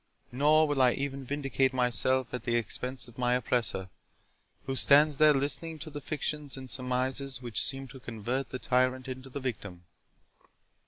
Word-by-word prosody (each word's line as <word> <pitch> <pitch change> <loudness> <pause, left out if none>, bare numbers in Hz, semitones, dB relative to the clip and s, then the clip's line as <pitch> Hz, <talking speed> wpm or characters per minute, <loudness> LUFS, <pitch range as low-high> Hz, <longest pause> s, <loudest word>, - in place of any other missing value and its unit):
Nor 150 +5 +4
will 145 -2 0
I 125 -1 +5
even 140 -1 -4
vindicate 135 -2 0
myself 130 0 +1
at 125 - -4
the 120 -2 0
expense 125 +3 -3
of 120 +1 -15
my 125 0 +2
oppressor, 115 -7 -1 0.7
who 135 - -3
stands 145 +2 +6
there 155 0 +7
listening 145 +3 0
to 155 +1 -8
the 145 0 -7
fictions 150 -1 -4
and 130 -2 -8
surmises 130 +1 -1
which 120 -4 -2
seem 135 0 0
to 135 - -11
convert 120 +3 -4
the 130 - -4
tyrant 130 +1 0
into 130 +1 -7
the 135 - -6
victim. 100 -9 -6
130 Hz, 165 wpm, -29 LUFS, 125-140 Hz, 0.7 s, there